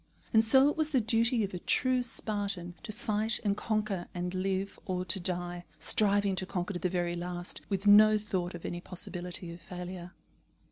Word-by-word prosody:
And 220 0 +6
so 265 +5 +6
it 295 - +1
was 315 -1 +1
the 275 -4 +3
duty 230 +1 +2
of 195 - -4
a 180 - -4
true 255 +6 +2
Spartan 200 -7 -1
to 215 - -6
fight 215 +1 -1
and 200 -2 +1
conquer 210 -5 -2
and 180 0 -3
live, 190 +1 -2
or 185 -1 -2
to 190 - -1
die, 175 0 -2
striving 200 -2 +3
to 185 - -1
conquer 180 +2 -3
to 175 - -4
the 180 - 0
very 175 -1 -1
last, 175 0 -4
with 195 0 -2
no 215 +1 +7
thought 185 -4 -3
of 170 - -9
any 175 0 -4
possibility 180 -1 -6
of 170 - -12
failure. 180 +1 -8
190 Hz, 190 wpm, -30 LUFS, 180-215 Hz, -, no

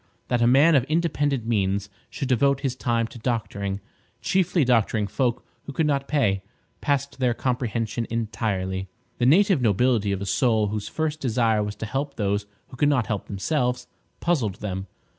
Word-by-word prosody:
That 120 -1 +1
a 120 - +5
man 140 +7 +6
of 135 -5 +5
independent 145 -5 0
means 100 -3 0 0.2
should 140 - -4
devote 140 +2 +2
his 135 -3 -1
time 115 -2 0
to 115 +1 -10
doctoring, 100 -4 -2 0.4
chiefly 180 -5 +2
doctoring 115 -3 +2
folk 120 +4 -1 0.2
who - - -6
could 160 - +1
not 140 -2 0
pay, 105 -10 +1 0.4
passed 140 -1 -1
their 125 -2 +2
comprehension 120 -2 -2
entirely. 105 -5 -2 0.3
The 120 - +3
native 185 +1 +5
nobility 110 -1 +2
of 100 - -1
a 100 - -4
soul 110 -1 +2
whose 105 0 -3
first 155 -1 -2
desire 115 -5 +2
was 105 0 -3
to 110 - -5
help 140 +5 -3
those 100 0 -1 0.2
who 130 - -11
could 145 +3 +3
not 130 -6 +2
help 105 -4 -3
themselves, 125 +4 -1 0.4
puzzled 130 - +1
them. 95 -1 -5
120 Hz, 170 wpm, -24 LUFS, 105-140 Hz, 0.4 s, man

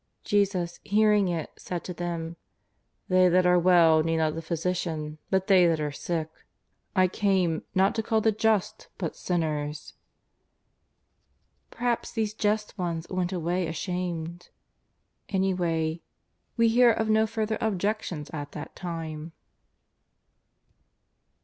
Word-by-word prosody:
Jesus 190 -4 0
hearing 210 -1 +3
it 170 -3 -3
said 175 -2 -5
to 180 - -5
them: 170 -1 -4 0.4
" - - -48
They 185 0 +5
that 180 +1 +3
are 180 0 +5
well 170 -3 +5
need 165 +1 0
not 155 -1 +1
the 165 - -5
physician, 160 -2 -3
but 190 -1 +1
they 185 -3 +6
that 165 -2 +1
are 150 -1 -2
sick. 160 +2 -3 0.7
I 185 -1 +5
came 185 -4 +1
not 190 +1 +4
to 225 - -1
call 220 0 +1
the 220 0 +3
just 215 0 0
but 170 -5 -3
sinners." 150 -4 -2 1.8
Perhaps 240 -1 -2
these 220 -3 -1
just 210 -1 -1
ones 170 -2 -2
went 185 -1 -1
away 175 0 -1
ashamed. 170 0 -4 0.8
Any 190 -1 +1
way 165 -2 -1 0.6
we 230 0 +5
hear 240 +2 +5
of 220 0 0
no 220 0 +3
further 220 0 -2
objections 200 -6 -2
at 145 -2 -6
that 150 - -8
time. 165 -2 -6
180 Hz, 130 wpm, -27 LUFS, 165-205 Hz, 1.8 s, they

